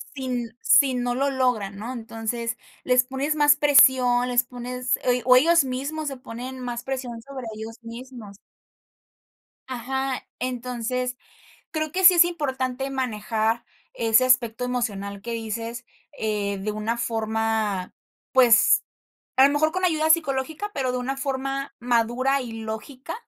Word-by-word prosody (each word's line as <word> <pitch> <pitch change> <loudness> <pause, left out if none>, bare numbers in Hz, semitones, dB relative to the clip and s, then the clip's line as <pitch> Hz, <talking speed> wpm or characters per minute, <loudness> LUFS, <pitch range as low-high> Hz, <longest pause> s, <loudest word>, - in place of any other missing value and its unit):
sin 245 -4 -4
si 270 -2 +5
no 245 -1 -1
lo 275 +2 +1
logran, 235 -7 0
¿no? 225 +4 -6
Entonces, 230 0 -4 0.3
les 250 -1 +4
pones 275 +4 -2
más 290 -1 +5
presión, 255 -4 +5
les 245 0 +2
pones 250 0 -3
ell 250 0 +2
o 250 0 +7
ellos 330 +3 +5
mismos 280 +4 -4
se 270 - -7
ponen 255 +2 -8
más 240 -1 -5
presión 255 -3 -5
sobre 265 -1 -8
ellos 225 +2 -8
mismos. 230 -3 -10 1.3
Ajá. 265 +1 -3
Entonces, 250 0 -3 0.5
creo 310 -1 -3
que 375 +1 -1
sí 365 0 +10
es 345 0 +7
importante 265 -5 -2
manejar 225 -2 -1 0.3
ese 225 +2 +3
aspecto 250 -2 +2
emocional 200 -5 -3
que 235 - -5
dices, 230 +2 -5 0.3
eh, 205 -2 -1
de 210 +2 -3
una 215 +2 -2
forma, 220 -4 -1 0.4
pues, 245 -3 +5 0.5
a 265 - +7
lo 280 - +1
mejor 310 +2 +2
con 370 +1 -1
ayuda 315 -2 +2
psicológica, 315 +5 +1
pero 260 -2 -1
de 250 - -1
una 265 +2 -3
forma 270 0 -3
madura 245 +3 +1
y 235 -2 -7
lógica, 225 +7 -6
250 Hz, 140 wpm, -24 LUFS, 230-270 Hz, 1.3 s, sí